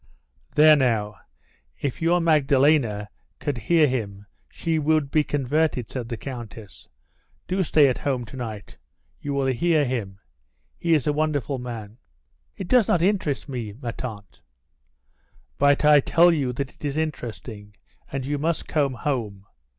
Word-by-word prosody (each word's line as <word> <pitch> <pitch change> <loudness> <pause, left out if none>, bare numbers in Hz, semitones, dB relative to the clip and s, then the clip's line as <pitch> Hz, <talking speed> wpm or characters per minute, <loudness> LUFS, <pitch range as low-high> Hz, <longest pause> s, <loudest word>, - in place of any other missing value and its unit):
"There 155 0 +7
now; 110 -7 0 0.6
if 140 +1 -3
your 170 +2 +3
Magdalene 140 -8 +3 0.3
could 145 -5 -3
hear 155 +7 +3
him 105 -6 -4 0.2
she 165 -2 -2
would 155 -2 +1
be 155 - +3
converted," 145 -3 -1
said 120 -3 -5
the 115 - -4
Countess. 115 -4 -9 0.6
"Do 190 +1 0
stay 155 -4 +4
at 130 - -1
home 130 -4 -2
to 115 - -12
night; 110 -6 -7 0.4
you 145 - -5
will 135 -1 0
hear 150 +4 +2
him. 110 -7 -3 0.6
He 165 -1 +3
is 145 - 0
a 150 - +1
wonderful 145 -4 -1
man." 115 -2 -8 0.6
"It 190 - -5
does 245 -2 +4
not 170 - +2
interest 185 -9 0
me, 120 -7 -5
ma 120 -4 -4
tante." 105 -5 -8 1.2
"But 145 +1 +3
I 150 -1 +7
tell 170 +4 +4
you 140 -6 0
that 135 +2 -4
it - - -24
is 145 0 -2
interesting, 115 -8 -5 0.4
and 135 -1 -3
you 145 +1 -2
must 160 +2 -1
come 140 -4 0
home. 115 -8 -3
135 Hz, 150 wpm, -24 LUFS, 115-155 Hz, 1.2 s, There